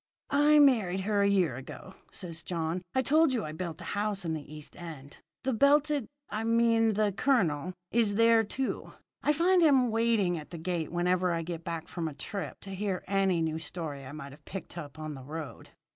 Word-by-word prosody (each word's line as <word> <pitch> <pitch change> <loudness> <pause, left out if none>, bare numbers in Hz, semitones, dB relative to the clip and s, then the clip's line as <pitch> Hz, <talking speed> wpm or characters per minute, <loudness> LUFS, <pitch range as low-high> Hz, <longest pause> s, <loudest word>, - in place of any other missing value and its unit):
"I 295 +2 +5
married 220 -11 +4
her 205 +1 +1
a 200 - +4
year 180 -10 +2
ago," 135 +7 -9 0.2
said 170 -3 -4
John. 165 +1 -2
"I 260 - +3
told 310 +2 +4
you 230 -4 -1
I 155 - -5
built 160 0 -5
a - - -5
house 205 -2 -1
in 160 - -1
the 150 -2 -6
East 150 -1 -8
End. 155 -5 -9 0.2
The 265 0 0
belted 285 +1 +3 0.2
I 215 +1 -3
mean 230 -1 +3
the 210 0 +2
colonel 185 - +1 0.2
is 220 -3 +3
there, 230 0 +5
too. 260 +5 -3 0.3
I 295 - +3
find 350 +4 +4
him 265 -7 +5
waiting 220 -6 +2
at 150 - -11
the 170 - -7
gate 165 -1 -2
whenever 180 +1 +1
I 165 -1 -1
get 170 0 -5
back 165 -1 -4
from 170 -2 -3
a 150 - -6
trip 200 +6 -5
to 195 - -8
hear 190 -1 -2
any 195 -3 +2
new 160 0 -1
story 160 -5 -5
I 130 - -8
might 140 -2 -8
have 145 - -15
picked 195 -3 -8
up 150 -4 -8
on 155 -1 -5
the 135 -2 -9
road." 155 +2 -7
185 Hz, 205 wpm, -30 LUFS, 160-230 Hz, 0.3 s, I